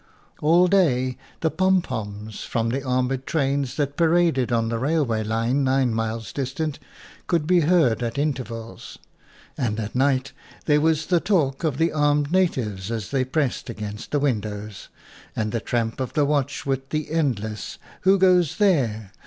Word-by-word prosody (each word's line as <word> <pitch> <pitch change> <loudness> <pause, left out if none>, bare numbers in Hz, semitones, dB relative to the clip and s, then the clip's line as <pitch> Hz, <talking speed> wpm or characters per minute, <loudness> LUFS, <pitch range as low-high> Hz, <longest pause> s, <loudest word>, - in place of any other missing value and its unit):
All 170 +4 +5
day 130 -10 +2 0.3
the 160 - +1
pom 185 +4 +3
poms 105 0 -6
from 115 0 -1
the 135 +4 -1
armored 130 0 -1
trains 140 -3 0
that 145 -1 -2
paraded 165 -7 +2
on 115 -1 +1
the 115 0 -2
railway 135 -5 0
line 115 +5 0
nine 130 -2 +2
miles 115 -1 -3
distant 140 +3 -3 0.5
could 165 -4 +1
be 180 +2 +4
heard 155 -8 +3
at 120 +2 -3
intervals; 120 -8 -4 0.6
and 115 -4 -1
at 110 -1 -4
night 130 0 +1 0.3
there 150 -1 +3
was 160 0 +2
the 175 +1 +2
talk 160 -8 0
of 150 -5 0
the 165 +2 +2
armed 145 -1 +1
natives 115 - 0
as 110 -4 -4
they 135 -2 +1
pressed 130 -1 -1
against 105 -2 -6
the 150 - 0
win 135 -7 +1
dows, 105 -1 -7 0.5
and 110 -1 -1
the 115 - -1
tramp 115 +1 -2
of 130 - -3
the 150 - +2
watch 145 -1 -1
with 135 -1 -2
the 155 -1 -3
endless 110 -10 -2 0.2
"Who 190 +1 +4
goes 180 -4 +3
there?" 120 - +1
135 Hz, 165 wpm, -23 LUFS, 115-155 Hz, 0.6 s, All